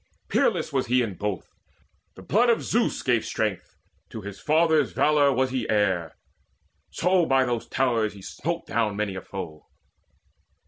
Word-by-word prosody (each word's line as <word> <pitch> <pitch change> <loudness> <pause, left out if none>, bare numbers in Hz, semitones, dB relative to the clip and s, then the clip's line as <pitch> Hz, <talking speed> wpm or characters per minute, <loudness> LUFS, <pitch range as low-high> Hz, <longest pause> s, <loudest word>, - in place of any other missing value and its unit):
Peerless - - +1
was 130 -2 0
he 125 +1 +3
in 110 -4 -3
both: 100 0 -4 0.6
the 95 - -12
blood 235 - +3
of 235 - +2
Zeus 235 +1 0
Gave 120 -4 +2
strength; 105 -4 -3 0.3
to 110 - -7
his 100 0 -8
father's 160 0 +2
valour 150 -2 +3
was 130 0 +1
he 130 -3 -2
heir; 95 -6 0 0.7
So 180 -1 +2
by 135 -1 +3
those 120 -2 -2
towers 115 -5 0
he 100 - -12
smote 170 - -4
down 110 -3 0
many 105 -1 -2
a 95 - -6
foe. 85 -6 -8
120 Hz, 155 wpm, -25 LUFS, 100-145 Hz, 0.7 s, he